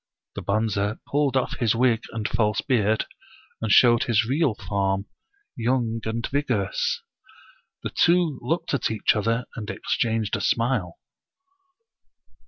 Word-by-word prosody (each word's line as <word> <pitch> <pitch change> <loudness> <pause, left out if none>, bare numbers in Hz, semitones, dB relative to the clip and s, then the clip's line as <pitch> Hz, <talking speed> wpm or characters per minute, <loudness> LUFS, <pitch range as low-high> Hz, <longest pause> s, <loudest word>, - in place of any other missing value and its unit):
The - - -5
Bonze 105 0 0
pulled 140 -2 +1
off 130 - -1
his 115 -2 +2
wig 120 -1 +2
and 110 -2 -2
false 105 -2 +1
beard, 110 -5 +1 0.6
and 110 -2 -1
showed 120 +1 +6
his 115 -1 +2
real 140 -2 +1
form, 95 0 -1 0.5
young 115 -1 0
and 115 +1 -2
vigorous. 125 -9 -1 0.8
The - - -3
two 170 -5 +3
looked 160 +8 -2
at 140 - +1
each 110 0 +1
other 115 +3 0
and 105 -3 -6
exchanged 115 -2 -1
a 105 - -3
smile. 115 -6 0
115 Hz, 130 wpm, -24 LUFS, 105-125 Hz, 0.8 s, showed